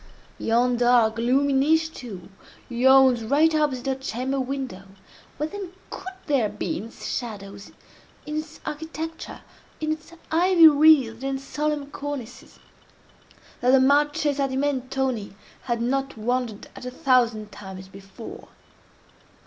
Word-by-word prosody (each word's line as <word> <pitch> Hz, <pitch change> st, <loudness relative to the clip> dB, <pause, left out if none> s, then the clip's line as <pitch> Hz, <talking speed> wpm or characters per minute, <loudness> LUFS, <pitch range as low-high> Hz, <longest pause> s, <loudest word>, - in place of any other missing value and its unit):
Yon 240 Hz, +2 st, +2 dB
dark, 240 Hz, -2 st, +4 dB
gloomy 265 Hz, +4 st, +2 dB
niche, 320 Hz, +4 st, +2 dB
too, 205 Hz, -8 st, -9 dB, 0.4 s
yawns 255 Hz, 0 st, +5 dB
right 300 Hz, +7 st, +3 dB
opposite 290 Hz, -5 st, 0 dB
her 270 Hz, -, +1 dB
chamber 265 Hz, +1 st, -3 dB
window—what, 255 Hz, +2 st, -6 dB
then, 390 Hz, -3 st, -7 dB, 0.2 s
could 380 Hz, 0 st, -7 dB
there 265 Hz, -8 st, +1 dB
be -, -, -3 dB
in 210 Hz, -, -7 dB
its 230 Hz, -, -11 dB
shadows—in 205 Hz, +6 st, -8 dB
its 310 Hz, 0 st, -6 dB
architecture—in 320 Hz, 0 st, -6 dB
its 310 Hz, +1 st, -5 dB, 0.2 s
ivy 340 Hz, 0 st, +6 dB
wreathed 285 Hz, -6 st, +5 dB
and 270 Hz, 0 st, -2 dB
solemn 295 Hz, +1 st, -2 dB
cornices—that 285 Hz, -6 st, -7 dB, 1.1 s
the 265 Hz, +1 st, +6 dB
Marchesa 290 Hz, +1 st, +2 dB
di 260 Hz, 0 st, -3 dB
Mentoni 260 Hz, -6 st, -1 dB, 0.3 s
had 235 Hz, -2 st, -1 dB
not 270 Hz, +1 st, -1 dB
wondered 235 Hz, -1 st, -2 dB
at -, -, -10 dB
a 250 Hz, -, -4 dB
thousand 245 Hz, -6 st, +1 dB
times 190 Hz, -2 st, -9 dB
before? 195 Hz, -, -11 dB
265 Hz, 115 wpm, -24 LUFS, 235-295 Hz, 1.1 s, ivy